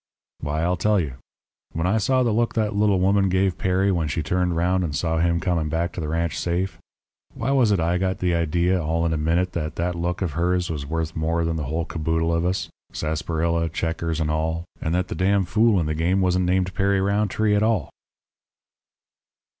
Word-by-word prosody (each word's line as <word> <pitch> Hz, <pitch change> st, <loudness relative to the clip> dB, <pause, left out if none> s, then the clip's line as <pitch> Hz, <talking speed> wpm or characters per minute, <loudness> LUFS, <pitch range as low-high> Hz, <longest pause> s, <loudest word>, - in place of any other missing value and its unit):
"Why, 75 Hz, +2 st, -2 dB
I'll 90 Hz, +1 st, +1 dB
tell 105 Hz, +4 st, +2 dB
you: 75 Hz, -7 st, -2 dB, 0.6 s
When 80 Hz, +1 st, -1 dB
I 105 Hz, +5 st, +2 dB
saw 130 Hz, +4 st, +2 dB
the 120 Hz, -, +1 dB
look 115 Hz, +1 st, 0 dB
that 110 Hz, -2 st, 0 dB
little 100 Hz, -2 st, +3 dB
woman 95 Hz, +1 st, +3 dB
gave 95 Hz, 0 st, +1 dB
Perry 95 Hz, +1 st, +2 dB
when 85 Hz, -4 st, 0 dB
she 75 Hz, +2 st, -2 dB
turned 90 Hz, +2 st, 0 dB
round 90 Hz, +2 st, +1 dB
and 75 Hz, -5 st, -3 dB
saw 80 Hz, +3 st, 0 dB
him 85 Hz, 0 st, +2 dB
coming 85 Hz, -2 st, 0 dB
back 85 Hz, +2 st, -1 dB
to -, -, -5 dB
the 75 Hz, -, -3 dB
ranch 85 Hz, +2 st, -1 dB
safe 90 Hz, +1 st, -2 dB, 0.6 s
why 135 Hz, -, -1 dB
was 130 Hz, -6 st, +4 dB
it 100 Hz, -, +2 dB
I 85 Hz, +2 st, +1 dB
got 95 Hz, 0 st, 0 dB
the 90 Hz, -2 st, 0 dB
idea 85 Hz, +2 st, +1 dB
all 80 Hz, +1 st, 0 dB
in 80 Hz, -, +1 dB
a -, -, 0 dB
minute 85 Hz, +4 st, +1 dB
that 75 Hz, -2 st, -3 dB
that 90 Hz, +1 st, -1 dB
look 85 Hz, +2 st, -2 dB
of 85 Hz, -, -1 dB
hers 90 Hz, +3 st, 0 dB
was 70 Hz, -3 st, -4 dB
worth 80 Hz, +1 st, -3 dB
more 80 Hz, +1 st, 0 dB
than 80 Hz, 0 st, -1 dB
the 75 Hz, -3 st, -3 dB
whole 80 Hz, +4 st, -2 dB
caboodle 80 Hz, 0 st, -1 dB
of 85 Hz, +1 st, 0 dB
us 95 Hz, +1 st, -1 dB, 0.2 s
sarsaparilla, 80 Hz, +2 st, -1 dB
checkers, 80 Hz, 0 st, -2 dB
and 75 Hz, -1 st, 0 dB
all, 80 Hz, +2 st, -1 dB, 0.2 s
and 80 Hz, +2 st, -1 dB
that 90 Hz, 0 st, 0 dB
the -, -, -4 dB
d 95 Hz, -, -1 dB
n 100 Hz, -1 st, +3 dB
fool 110 Hz, +1 st, +3 dB
in 80 Hz, -, 0 dB
the 75 Hz, -, -1 dB
game 85 Hz, +5 st, +1 dB
wasn't 90 Hz, -1 st, +2 dB
named 90 Hz, +1 st, +1 dB
Perry 100 Hz, -1 st, +1 dB
Rountree 105 Hz, +2 st, +1 dB
at 105 Hz, -, +3 dB
all?" 110 Hz, -9 st, +1 dB
85 Hz, 215 wpm, -23 LUFS, 80-95 Hz, 0.6 s, was